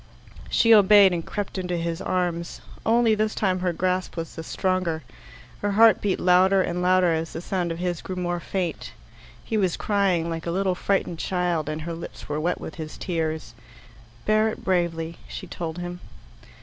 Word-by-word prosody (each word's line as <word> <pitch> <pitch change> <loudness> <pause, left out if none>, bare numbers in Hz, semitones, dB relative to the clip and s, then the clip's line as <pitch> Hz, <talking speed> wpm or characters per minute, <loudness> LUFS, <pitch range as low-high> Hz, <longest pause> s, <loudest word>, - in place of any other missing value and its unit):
She 230 -1 +5
obeyed, 205 -2 +7
and 170 -1 -2
crept 205 0 -4
into 180 -1 -2
his 170 +1 -3
arms. 175 -2 -2 0.3
Only 230 0 +4
this 215 0 0
time 185 -3 +1
her 180 -1 0
grasp 185 +1 -1
was 165 -1 -4
the 165 - -6
stronger. 185 -3 -1 0.6
Her 205 0 0
heart 225 +1 +6
beat 200 -2 0
louder 185 +1 +4
and 175 0 -2
louder 180 -1 +4
as 160 0 -3
the - - -4
sound 175 -1 -2
of 165 - -4
his 175 -1 -2
grew 185 - -6
more 175 -1 -2
faint. 180 -1 -4 0.5
He 225 - -2
was 185 -4 +1
crying 195 -5 +1
like 165 0 -4
a - - 0
little 190 +1 +1
frightened 180 -2 -1
child, 175 -5 -1
and 155 +1 -3
her 170 +1 -4
lips 165 - -9
were 150 0 -2
wet 175 +3 -1
with - - -7
his 155 0 -7
tears. 160 -3 -3 0.7
"Bear 215 +1 +3
it - - -8
bravely," 170 -3 -1
she - - -7
told 165 -1 -5
him. 175 0 -5
180 Hz, 185 wpm, -25 LUFS, 165-190 Hz, 0.7 s, obeyed